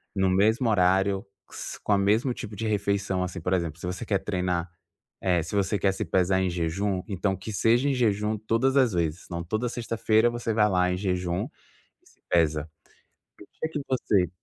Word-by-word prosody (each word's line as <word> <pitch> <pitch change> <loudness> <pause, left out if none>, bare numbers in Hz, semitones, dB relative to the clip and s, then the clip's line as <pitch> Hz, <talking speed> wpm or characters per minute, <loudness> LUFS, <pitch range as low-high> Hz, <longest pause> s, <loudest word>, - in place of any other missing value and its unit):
no 95 -1 +2
mesmo 110 +6 +3
horário. 95 0 +2 0.2
Q - - -14
s - - -6
com - - -1
a - - +4
mesmo 110 +6 +2
tipo 110 -3 -7
de 110 - -4
refeição, 100 -2 0
assim. 90 +1 -5
Por 90 +3 -1
exemplo, 85 -3 -1
se - - -6
você 90 +6 -4
quer 105 -3 +1
treinar 90 -3 -1 0.5
eh, 90 -3 +2
se 90 - -5
você 100 0 +1
quer 95 +1 +3
se 110 - -3
pesar 95 +2 +2
em 95 - +1
jejum, 90 +3 -1
então 95 -1 -1
que 95 +4 -7
seja 120 +6 +3
em 140 - +2
jejum 105 -3 +1
todas 115 +5 +1
as 125 -7 +4
vezes. 85 0 -1
Então, 85 -1 -5
toda 110 +8 -2
sexta-feira 115 -1 +1
você 120 -1 -2
vai 105 -1 +3
lá 90 -1 +2
em 90 - -1
jejum 90 -2 -1 0.6
e - - -25
se - - -28
pesa. 80 -2 +2 0.7
No - - -13
dia 160 - -2
que 150 - -2
você 100 -8 +1
100 Hz, 205 wpm, -26 LUFS, 90-110 Hz, 0.7 s, a